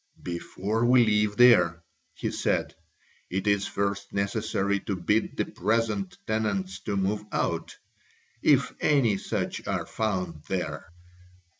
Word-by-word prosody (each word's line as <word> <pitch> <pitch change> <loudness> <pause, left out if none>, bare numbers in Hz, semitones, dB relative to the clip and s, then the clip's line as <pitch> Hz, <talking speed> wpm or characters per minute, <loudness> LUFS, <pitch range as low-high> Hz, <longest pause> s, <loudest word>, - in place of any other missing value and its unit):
"Before 95 +5 -2
we 120 0 +6
live 105 -1 +2
there," 100 -9 +6 0.3
he - - -3
said, - - 0 0.6
"it 95 +2 -2
is 100 -1 +2
first 100 0 -2
necessary 100 0 0
to 100 - -3
bid 105 +4 0
the - - +1
present 110 -4 -1
tenants 100 -4 -1
to 100 -2 -1
move 100 +2 0
out, - - -2 0.6
if 135 -4 +3
any 125 -9 +3
such - - -3
are - - -1
found 90 -7 -2
there." 80 -3 -3
100 Hz, 125 wpm, -27 LUFS, 95-110 Hz, 0.6 s, we